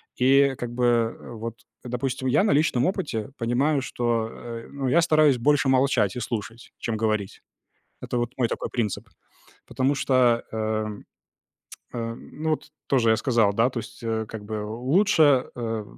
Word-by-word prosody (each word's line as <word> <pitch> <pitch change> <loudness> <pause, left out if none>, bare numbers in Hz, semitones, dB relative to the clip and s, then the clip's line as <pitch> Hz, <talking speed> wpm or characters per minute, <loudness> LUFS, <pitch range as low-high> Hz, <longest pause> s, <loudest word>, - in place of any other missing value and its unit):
И 135 +1 +4
как 120 -1 -5
бы, 125 - -2
э, 115 -1 0
вот, 115 +1 -7 0.2
допустим, 130 +1 -3
я 130 +10 +3
на 210 - +2
личном 140 -4 +2
опыте 145 - -2
понимаю, 135 +5 +1
что, 120 -3 -1
э, 115 -1 -8
ну, 140 -2 -3
я 170 +7 +4
стараюсь 155 -5 +4
больше 145 +2 +2
молчать 130 0 +2
и - - -3
слушать, 115 0 -5
чем 115 -2 -2
говорить. 110 -3 -1 0.6
Это 125 - -2
вот 120 +1 -2
мой 125 - +2
такой - - -3
принцип, 110 -5 -3 0.6
потому 135 +2 0
что, 125 -4 +2
эм, 110 -1 -3 0.9
э, 115 -1 -3
ну, 155 +6 -5
вот 155 -1 -2 0.2
тоже 120 -5 +3
я 110 - +4
сказал, 115 -5 +2
да, 115 +4 +3
то 125 - -4
есть, 115 - -9
а, 110 -1 -1
как 110 -1 -8
бы, 105 0 -4
лучше, 140 - +3
э, 115 -3 -3
120 Hz, 165 wpm, -25 LUFS, 115-135 Hz, 0.9 s, И